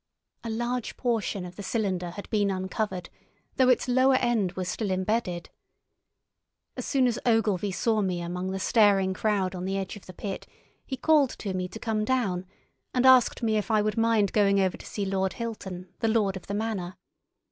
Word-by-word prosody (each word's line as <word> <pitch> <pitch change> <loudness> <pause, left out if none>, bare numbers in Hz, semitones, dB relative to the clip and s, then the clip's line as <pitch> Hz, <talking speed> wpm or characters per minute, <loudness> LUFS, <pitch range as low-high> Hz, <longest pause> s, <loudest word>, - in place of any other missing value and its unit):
A 230 - -4
large 240 +2 -2
portion 220 -6 -1
of 180 0 -10
the - - -5
cylinder 190 -4 -1
had 195 +4 -8
been 205 -2 +2
uncovered, 190 -1 -3 0.5
though 260 -1 +5
its 255 - +3
lower 260 +1 +4
end 235 -8 +1
was 185 -1 -4
still 205 +2 -2
embedded. 185 -2 -1 1.2
As - - -5
soon 270 -3 +3
as 240 -2 +1
Ogilvy 215 -4 +2
saw 220 +3 +1
me 185 -3 -1
among 180 +2 -3
the 190 - -2
staring 195 -1 +3
crowd 195 -2 0
on 180 0 -5
the 195 +1 -1
edge 195 +1 -4
of 205 - -13
the 185 - -9
pit 195 +2 -6 0.4
he 265 - -4
called 295 -1 +4
to 195 -3 -4
me 185 0 -2
to 185 - -9
come 220 -2 -1
down, 205 -7 0 0.5
and 250 0 +3
asked 255 -2 +6
me 220 -1 +2
if 210 - -2
I 215 -2 +3
would 215 0 -1
mind 225 -3 +2
going 200 -2 +4
over 190 -2 +1
to - - -12
see 205 - -3
Lord 190 -1 0
Hilton, 190 -6 -6
the 225 - +1
lord 215 -3 +2
of 190 - -9
the 200 - -3
manor. 205 -4 -3
205 Hz, 195 wpm, -27 LUFS, 185-230 Hz, 1.2 s, asked